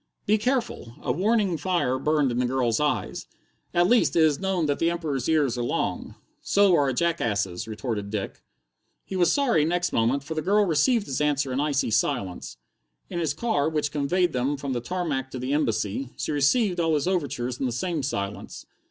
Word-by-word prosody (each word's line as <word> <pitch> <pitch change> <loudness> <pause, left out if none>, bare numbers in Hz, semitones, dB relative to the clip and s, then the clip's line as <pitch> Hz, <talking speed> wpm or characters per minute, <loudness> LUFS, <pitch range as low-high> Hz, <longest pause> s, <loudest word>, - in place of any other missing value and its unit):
"Be 215 +1 +3
careful!" 235 - -2
A - - 0
warning 200 -1 +1
fire 170 -8 0
burned 150 -2 +1
in 120 - -1
the 125 - +1
girl's 125 -3 0
eyes. 150 0 -1 0.4
"At 175 0 +3
least, 240 +5 +3
it 165 - +5
is 150 -3 +3
known 190 -3 0
that 145 -1 -1
the 165 - +2
Emperor's 155 -7 -2
ears 145 -6 +2
are - - -1
long." 120 - -2 0.3
"So 200 -3 +4
are 145 -3 +3
a - - -1
jackass's," 110 - -1
retorted 110 -2 -4
Dick. 100 -2 -4 0.6
He 190 - -6
was 175 -2 +3
sorry 255 - +2
next 175 +3 0
moment, 120 +5 +1
for 155 +3 -5
the 155 - -2
girl 205 +5 +3
received 205 - +2
his 135 +1 -3
answer 145 -3 +1
in 130 - -1
icy 145 -5 0
silence. 90 - -1 0.5
In 175 - -2
his 155 -4 -1
car, 160 -9 0
which 150 -2 -1
conveyed 165 +4 +1
them 130 +3 0
from 140 -1 -4
the 120 - -2
tarmac 145 -3 -3
to 130 - -7
the 130 +2 -2
Embassy, 120 -3 -1
she - - -3
received 175 - +2
all 165 -2 +2
his 145 +3 -1
overtures 140 -9 -2
in 135 - 0
the - - -2
same 160 +6 -2
silence. 100 -7 -4
145 Hz, 195 wpm, -25 LUFS, 125-175 Hz, 0.6 s, it